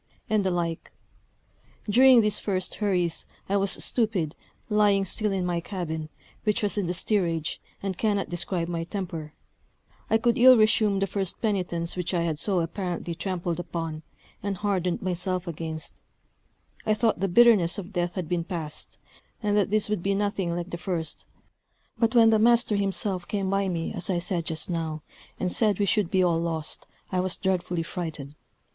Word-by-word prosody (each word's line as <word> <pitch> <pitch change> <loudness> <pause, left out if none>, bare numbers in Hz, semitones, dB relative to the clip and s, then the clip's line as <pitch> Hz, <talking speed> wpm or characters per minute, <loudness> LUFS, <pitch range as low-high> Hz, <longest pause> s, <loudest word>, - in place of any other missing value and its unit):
and 215 -2 +3
the 190 - +1
like. 170 -2 -2 1.0
During 250 +3 +7
these 210 -1 0
first 185 -3 -2
hurries 180 -5 0 0.2
I 200 - 0
was 195 -1 +1
stupid, 205 - 0 0.3
lying 205 -2 +3
still 210 +3 0
in 190 -2 -1
my 175 -1 0
cabin, 160 -4 -4 0.3
which 215 +1 +1
was 205 - +1
in 200 -4 -1
the 175 - -1
steerage, 170 -5 0 0.2
and 195 -2 -2
cannot 205 -3 +1
describe 175 0 -2
my 170 -1 -2
temper: 165 -5 -5 0.7
I 220 - +5
could 235 +2 +1
ill 255 +1 +9
resume 215 -2 +3
the 195 - +1
first 195 -1 -2
penitence 180 -6 -1
which 180 0 -2
I 170 - +1
had 160 -3 -1
so 190 -2 +1
apparently 175 0 -3
trampled 175 -1 -3
upon, 165 -3 -4 0.4
and 200 -1 -2
hardened 185 -3 -1
myself 180 0 -1
against: 160 -2 -6 0.8
I 215 -1 +2
thought 220 -3 +1
the 195 - +1
bitterness 200 -4 +5
of 200 0 -7
death 175 -1 -1
had 180 -4 -3
been 175 0 0
past; 165 -4 -6 0.5
and 205 -1 +2
that 205 -2 +2
this 215 0 +2
would 210 -4 -1
be 195 +2 +1
nothing 195 -4 -1
like 175 +1 -4
the 170 - -4
first; 170 -5 -2 0.7
but 230 0 +2
when 225 -1 +7
the 220 - +4
master 235 -1 +4
himself 195 -2 0
came 195 -2 -1
by 195 0 +1
me, 165 -2 -2
as 175 - -4
I 185 - +1
said 175 -1 -2
just 160 -1 0
now, 160 -3 -3 0.4
and 180 -1 -1
said 210 -4 +2
we 205 - +2
should 200 -1 +1
be 185 -1 +3
all 170 -2 +2
lost, 160 -2 -3 0.2
I 185 - +1
was 185 0 0
dreadfully 180 -3 -1
frighted. 160 -5 -5
185 Hz, 175 wpm, -26 LUFS, 170-205 Hz, 1.0 s, ill